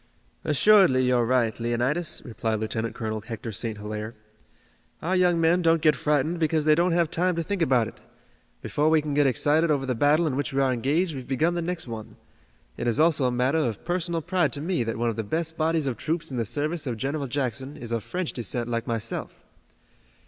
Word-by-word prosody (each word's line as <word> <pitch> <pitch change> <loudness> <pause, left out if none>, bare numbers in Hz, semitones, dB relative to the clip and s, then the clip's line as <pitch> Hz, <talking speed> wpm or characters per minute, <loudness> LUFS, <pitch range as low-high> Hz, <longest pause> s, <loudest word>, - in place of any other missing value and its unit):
"Assuredly 160 -3 +5
you're 125 -2 +2
right, 120 -3 +1
Leonidas," 125 +8 -1
replied 110 -3 -2
Lieutenant 110 +1 -3
Colonel 110 -1 -3
Hector 115 0 -6
St. 110 +1 -4
Hilaire. 105 +2 -6 0.8
"Our 180 +4 -1
young 180 -2 +3
men 165 +2 +3
don't 165 -1 +3
get 155 -2 +5
frightened 150 +4 0
because 155 -1 +1
they 155 - +6
don't 170 +2 +2
have 170 -2 +1
time 180 +1 +1
to 165 - -1
think 200 +1 -3
about 125 -7 +3
it. - - -12 0.6
Before 150 +2 +1
we 160 -1 +3
can 150 -1 -3
get 145 -1 +3
excited 150 +6 +2
over 140 -3 +1
the 130 - 0
battle 145 +7 +3
in 145 -5 -1
which 140 -1 -2
we 135 - +1
are 135 -1 +2
engaged 150 +8 0
we've 130 -3 -7
begun 155 +6 +1
the 175 - -1
next 170 -3 -3
one. 110 -2 -7 0.6
It - - -3
is 120 +4 +1
also 155 -4 +3
a 125 - +2
matter 130 +6 +1
of 120 -9 -2
personal 175 -1 -1
pride 175 -6 +1
to - - -4
me 170 -4 0
that 115 -1 -3
one 120 0 0
of 110 - -8
the 110 - -1
best 160 +8 -2
bodies 160 -1 +1
of 130 -4 -2
troops 165 +2 -3
in 130 - -4
the 115 - 0
service 150 +6 -2
of 120 -3 -2
General 140 +4 -2
Jackson 135 +1 -3
is 115 -1 -7
of 115 -2 -1
French 180 -2 -3
descent 120 0 -3
like 115 0 -2
myself." 115 -1 -4
140 Hz, 215 wpm, -25 LUFS, 120-165 Hz, 0.8 s, they